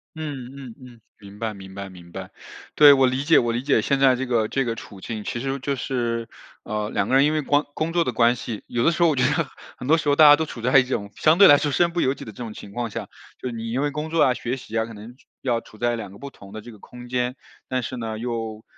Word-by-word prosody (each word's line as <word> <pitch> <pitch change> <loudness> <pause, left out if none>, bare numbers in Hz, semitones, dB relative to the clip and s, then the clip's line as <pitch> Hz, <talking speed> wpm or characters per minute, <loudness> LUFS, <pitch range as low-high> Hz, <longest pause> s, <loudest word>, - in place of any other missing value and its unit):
嗯 145 -6 -6
嗯 125 -5 -9
嗯， 120 -3 -14 0.2
明 100 0 -13
白 110 -1 -3
明 95 -1 -12
白 100 0 -6
明 85 -2 -14
白。 - - -8 0.4
对， 145 -1 +8
我 135 -1 +4
理 130 +2 0
解 160 +2 +5
我 120 -1 +2
理 120 - -1
解 135 -5 +2
现 140 -1 +1
在 130 -2 +5
这 130 +1 -3
个 115 -3 +1
这 135 +2 -1
个 115 - -1
处 100 -3 -11
境， 110 -2 -5
其 120 - -4
实 135 +1 -3
就 140 +1 -2
是， 115 -3 -2 0.4
呃， 105 0 -3
两 - - -1
个 130 - +2
人 135 +2 +6
因 155 - +2
为 155 - 0
光 145 +2 +2
工 165 +2 -2
作 170 -1 +3
的 125 - -2
关 120 +1 +3
系， 115 -3 -6
有 120 -1 -2
的 165 - +4
时 170 +1 +1
候 170 - +5
我 150 - +1
觉 130 - +1
得 145 +3 +1 0.3
很 125 - -7
多 160 +2 +5
时 145 - -1
候 145 - +4
大 155 -1 +8
家 145 - +9
都 160 +1 -2
处 115 - -8
在 125 +3 +5
一 - - +3
种 105 -6 -4
相 160 +2 +3
对 200 - +9
来 145 - +8
说 145 - -1
身 170 +4 +2
不 170 - -1
由 130 - +2
己 - - -10
的 110 - -8
这 - - -20
种 115 -3 -6
情 100 - -10
况 120 +1 -3
下。 - - -6 0.3
就 130 - -6
是 115 - -6
你 115 0 -5
因 130 +3 -1
为 145 0 0
工 155 +2 -4
作 165 0 +3
啊 130 - +4
学 125 +2 -4
习 115 -3 -10
啊， 110 - +1
可 115 - -10
能 110 +4 -11 0.3
要 120 -3 0
处 110 - -17
在 120 +1 0
两 105 -4 -7
个 100 - -13
不 140 +3 -9
同 100 +1 -14
的 110 - -7
这 120 - -11
个 105 - -15
空 125 +3 -12
间， 125 +1 -1 0.3
但 130 -1 -2
是 130 - -5
呢， 110 -2 -4
又 115 -2 -4
125 Hz, 325 characters per minute, -23 LUFS, 115-140 Hz, 0.4 s, 家